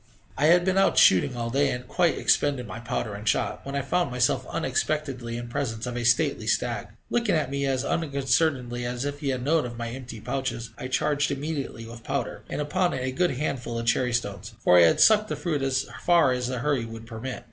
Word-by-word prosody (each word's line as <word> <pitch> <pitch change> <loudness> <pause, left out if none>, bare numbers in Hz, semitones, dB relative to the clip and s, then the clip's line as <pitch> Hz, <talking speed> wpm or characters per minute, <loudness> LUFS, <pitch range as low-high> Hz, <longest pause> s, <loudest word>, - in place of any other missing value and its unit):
I 150 - +2
had 175 +2 +5
been 190 0 +2
out 195 - +3
shooting 95 +7 +5
all 115 0 -3
day, 140 +2 +2
and 125 - -3
had - - -20
quite 170 +3 +1
expended 140 -4 +2
my 105 +2 -7
powder 115 -2 -3
and 105 +1 -2
shot, - - -1
when 140 - -4
I 140 - -1
found 175 +5 0
myself 125 0 +1
unexpectedly 135 -6 -2
in 120 0 -6
presence 120 -2 -3
of 120 -1 -4
a 120 - -2
stately 120 0 +2
stag, - - 0 0.2
looking 235 -6 +2
at 145 -4 -1
me 140 0 -1
as 130 0 0
unconcernedly 135 -4 0
as 120 +2 -3
if 145 0 -4
he 140 - -2
had 130 -2 -2
known 155 +3 +2
of 120 -1 -6
my 115 0 -4
empty 125 -2 -8
pouches. 120 -1 -3
I 130 - -6
charged 145 +2 +1
immediately 140 -5 -4
with 115 0 -11
powder, 135 -5 -3
and - - -4
upon 175 +5 0
it 125 - -3
a 130 - -1
good 135 0 0
handful 125 -5 -3
of 115 - -3
cherrystones, 115 -4 -1
for 90 -5 +5
I 85 - +8
had - - +2
sucked 215 -1 +6
the - - -1
fruit 150 -1 -2
as 135 -1 0 0.2
far 170 -6 +4
as 125 -1 -1
the 130 0 -3
hurry 140 -1 0
would 115 0 -8
permit. 115 +2 -6
130 Hz, 225 wpm, -26 LUFS, 120-145 Hz, 0.2 s, I